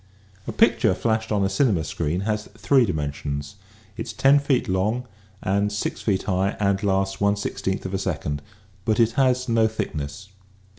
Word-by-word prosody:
A - - -2
picture - - +3
flashed 110 -1 -1
on 105 -2 +2
a - - +3
cinema 95 - +2
screen 80 +3 -2
has 105 +1 -2
three 130 +1 +3
di - - +1
mensions. 70 0 -4 0.4
It - - -4
is, 105 - -7
say, 135 - +5
lo 145 - +6
feet 135 -3 +1
long 105 +7 0 0.4
and 100 +2 +1
6 105 - -3
feet 100 -4 0
high 95 0 0
and 100 -1 +1
lasts 95 -1 0
1 100 0 +3
16 95 -1 -3
of 95 - -4
a 95 - 0
second, 75 -6 -2 0.4
but 110 +1 +1
it 115 -1 +4
has 130 0 +2
no 115 -2 +3
thickness. 95 -3 -5
100 Hz, 185 wpm, -24 LUFS, 95-110 Hz, 0.4 s, lo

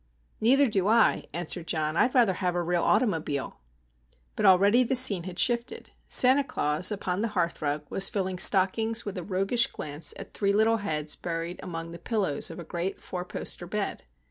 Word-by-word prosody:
"Neither 270 +5 +3
do 195 -4 -1
I," 230 +2 +2
answered 175 0 -4
John. 155 -1 -2
"I'd 250 +9 +1
rather 235 -7 +3
have 180 -1 -3
a 175 - -1
real 175 0 -1
automobile." 165 - -1 0.8
But - - +1
already 200 +6 +5
the 255 +2 -1
scene 205 -9 +6
had 180 -2 -8
shifted. 235 +1 -1 0.2
Santa 260 +3 +7
Claus, 180 - 0
upon 190 -2 -3
the 230 - 0
hearthrug, 150 -4 -2
was 195 - +2
filling 190 -2 -3
stockings 220 +5 +3
with 205 - -6
a - - -7
roguish 195 +6 +1
glance 150 +1 -2
at - - -11
three 200 -1 0
little 220 +2 +2
heads 155 -7 -3
buried 170 +1 -5
among 165 -1 -7
the 170 - -10
pillows 190 -6 -1
of - - -9
a 175 - -8
great 175 +3 -5
four 180 -1 -6
poster 180 0 -5
bed. 210 +2 -4
185 Hz, 180 wpm, -26 LUFS, 170-220 Hz, 0.8 s, Santa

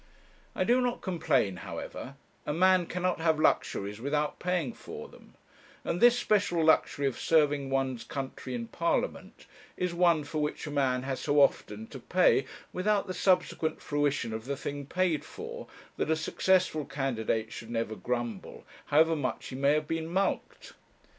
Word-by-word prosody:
I - - +1
do 250 +2 +3
not 245 -1 -1
complain, 160 - +1
however; 135 +8 -7 0.3
a 150 - 0
man 185 +1 +4
cannot 180 -1 -1
have 160 -2 +2
luxuries 105 -7 +1
without 150 +2 -1
paying 175 -9 -1
for - - -9
them; - - -18 0.5
and 175 - -2
this 240 0 +7
special 195 -8 +2
luxury 150 -2 +3
of 135 - -1
serving 145 -4 +2
one's 135 -3 -1
country 135 -2 -5
in 115 -1 -4
Parliament - - -2 0.3
is 180 -1 -1
one 170 -3 +3
for 150 +1 -3
which 150 +1 -2
a 150 - -5
man 130 -3 +1
has 135 -1 -3
so 145 0 +2
often 110 -6 +2
to 135 - -8
pay, 175 -1 +3 0.3
without 200 +2 +1
the 185 - -4
subsequent 180 -3 +1
fruition 145 -5 -1
of 110 0 -5
the 140 +1 -3
thing 145 0 -5
paid 180 -2 0
for, 470 +2 -8 0.3
that - - -1
a 160 - +4
successful 165 0 +1
candidate 125 -6 -2
should 115 - -8
never 115 -2 -2
grumble, 120 -4 -4 0.2
however 160 +2 +4
much 145 -4 -3
he 130 - -6
may 140 +2 +3
have 155 0 -1
been 165 0 -2
mulcted. 190 +4 -2
150 Hz, 165 wpm, -29 LUFS, 130-175 Hz, 0.5 s, this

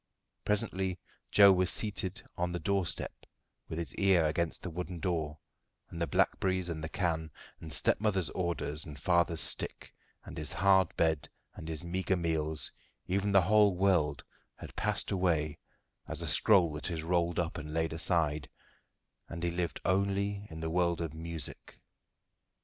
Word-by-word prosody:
Presently 95 -3 -1 0.3
Joe 100 -1 +8
was 90 -1 +2
seated 105 -1 0
on 90 0 -1
the 90 - -3
doorstep, 95 +2 -1 0.6
with 80 - -4
his 85 - -3
ear 95 -4 +4
against 80 +2 -1
the 90 - -4
wooden 90 +1 -5
door, 80 -4 -2 0.5
and 85 - -6
the 85 - +1
blackberries 95 +4 +1
and 80 -2 -4
the 80 - -4
can, 80 -3 -1 0.3
and 80 - -9
stepmother's 95 - +2
orders 80 -4 -2
and 75 -2 -9
father's 85 0 +2
stick, - - +1 0.3
and - - -7
his 75 -1 -3
hard 95 -2 +4
bed 80 -3 +1 0.2
and 80 - -9
his 80 +1 -4
meagre 95 +2 -1
meals, 80 -3 -1 0.3
even 100 +2 0
the 95 -2 +5
whole 105 -1 +4
world 85 -7 +2 0.3
had - - -11
passed - - 0
away 80 -6 0 0.5
as - - -2
a - - -3
scroll 90 -7 +4
that 75 +4 -3
is 80 -3 -3
rolled 85 0 +1
up 85 -1 -1
and 75 +1 -7
laid 80 0 -1
aside, 80 -3 0 0.8
and 85 +1 -6
he 85 - +1
lived 85 0 -2
only 100 +1 0
in 80 0 -8
the 80 0 -2
world 85 0 +1
of 80 -3 -3
music. 80 -1 -6
85 Hz, 160 wpm, -31 LUFS, 80-95 Hz, 0.8 s, Joe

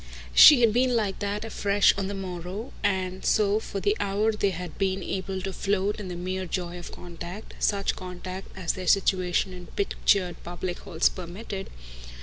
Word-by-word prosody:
She 275 - +10
had 225 -3 +5
been 250 +1 +3
like 210 -4 0
that 205 +1 -2
afresh 205 -2 +3
on 195 -1 -2
the 200 - -4
morrow; 185 +4 -6
and 185 -2 -1
so 210 0 +3
for 200 - -5
the 205 +2 +1
hour 205 +2 +1
they 210 -2 +1
had 180 -2 -6
been 190 -1 0
able 190 0 -3
to 195 -1 -3
float 200 +2 0
in 205 - -6
the 180 - -5
mere 185 +1 -3
joy 175 0 -3
of 175 - -9
contact 175 +4 -9
such 200 -1 +1
contact 185 +1 -7
as 180 -3 -1
their 185 -2 -6
situation 185 -1 +2
in 180 -1 -10
pictured 195 -2 0
public 175 +1 -5
halls 170 -5 +1
permitted. 190 +2 -6
190 Hz, 175 wpm, -26 LUFS, 180-205 Hz, -, She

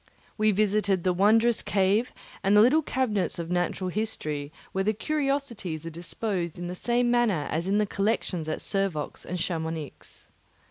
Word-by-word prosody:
We 215 0 +3
visited 205 -2 +2
the 185 - +2
wondrous 225 +5 +4
cave 205 +5 +1 0.3
and 200 +2 +4
the - - +8
little 270 +8 +5
cabinets 250 -10 0
of 170 0 -5
natural 180 +1 -1
history, 155 -9 -3 0.2
where 195 - 0
the 215 +2 +1
curiosities 275 - -2
are 165 - -5
disposed 175 +1 -3
in 175 - -5
the 175 - -4
same 240 +5 +1
manner 220 -11 +2
as 170 +3 -1
in 200 +2 +2
the 210 - +3
collections 195 -5 -1
at 155 - -3
Servox 195 -7 -2
and 180 - -3
Chamounix. 160 -4 -4
195 Hz, 160 wpm, -27 LUFS, 175-220 Hz, 0.3 s, the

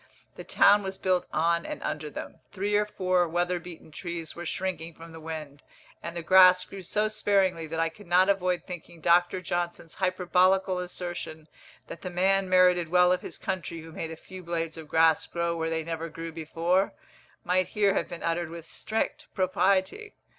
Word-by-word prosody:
The - - -8
town 205 +1 +5
was 190 -1 -5
built 185 -2 0
on 170 +2 +1
and - - -6
under 150 0 -3
them. - - -8
Three 205 +2 -1
or 210 0 +2
four 185 -3 +1
weather 175 +2 0
beaten 170 -2 -12
trees 170 -1 -6
were 175 0 -6
shrinking 170 -3 -4
from 165 0 -12
the 160 - -10
wind, 155 -3 -7 0.4
and 170 0 -6
the 170 - -4
grass 185 +1 +7
grew 195 - -9
so 210 +4 0
sparingly 195 -6 +1
that 160 +1 -4
I 165 0 +2
could 195 +4 -16
not 180 +2 +5
avoid 185 -3 +1
thinking 175 -1 -9
Dr. 175 +2 +3
Johnson's 175 -1 -3
hyperbolical 185 0 +2
assertion 175 -3 -6 0.4
"that 165 - -9
the 185 - -5
man 190 +2 +1
merited 180 -2 +4
well 180 +1 +5
of 180 0 +1
his - - -8
country 170 -2 -4
who 165 +1 -11
made 160 0 -5
a 160 - -6
few 185 +3 -11
blades 165 -2 -3
of 160 -2 -9
grass 160 0 +3
grow 170 0 -1
where 165 0 -2
they 160 0 -1
never 165 0 -4
grew 165 +1 -7
before," 165 +4 0 0.5
might 185 +1 +1
here 205 -2 +2
have - - -1
been 170 - -7
uttered 165 0 -1
with 165 -1 -9
strict 220 +6 -3
propriety. 190 - +1
175 Hz, 190 wpm, -27 LUFS, 165-185 Hz, 0.5 s, grass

